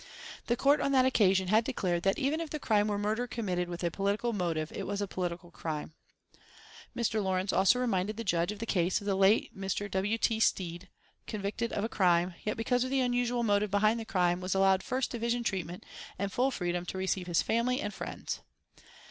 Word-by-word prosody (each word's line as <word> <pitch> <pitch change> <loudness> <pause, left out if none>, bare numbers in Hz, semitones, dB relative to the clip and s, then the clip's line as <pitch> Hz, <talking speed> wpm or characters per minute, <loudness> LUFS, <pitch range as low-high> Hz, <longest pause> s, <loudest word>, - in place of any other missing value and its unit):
The 240 - +2
Court 280 +3 +4
on 275 - +1
that 260 -1 +5
occasion 190 -7 +3
had 220 +3 +4
declared 185 -9 -1
that 195 +2 +1
even 285 +4 0
if 330 - -5
the 305 - -3
crime 215 -7 +2
were 205 -1 0
murder 215 +4 -1
committed 185 -7 -2
with 175 0 -5
a 170 - +1
political 200 +6 -1
motive 165 -5 -1
it - - -5
was 200 +1 -2
a 205 - 0
political 175 -2 -4
crime. 155 -2 -5 1.0
Mr. 220 -3 0
Lawrence 190 0 0
also 195 +6 +4
reminded 215 -3 0
the 230 - -3
judge 175 -2 +1
of 210 - -7
the 230 - -4
case 180 -4 +1
of 200 - -11
the 200 - +1
late 195 +4 +3
Mr. 195 +1 -3
W. 200 +4 0
T. 225 -1 +1
Stead, 180 -3 0 0.4
convicted 215 +2 -3
of 200 - -2
a - - +1
crime, 180 -4 +2
yet 215 - -2
because 245 +2 +1
of 255 - -3
the 270 0 +1
unusual 245 -1 +1
motive 205 -1 +2
behind 215 +3 +2
the - - -4
crime, 180 -4 +1
was 185 +1 -1
allowed 190 0 +4
first 260 +4 -2
division 235 0 -1
treatment 180 -4 -3 0.3
and 200 +1 -2
full 255 +2 +2
freedom 175 -7 -2
to 190 - -4
receive 190 -1 -1
his 170 -2 +2
family 240 +3 +1
and 205 - -3
friends. - - -5
205 Hz, 210 wpm, -30 LUFS, 185-230 Hz, 1.0 s, that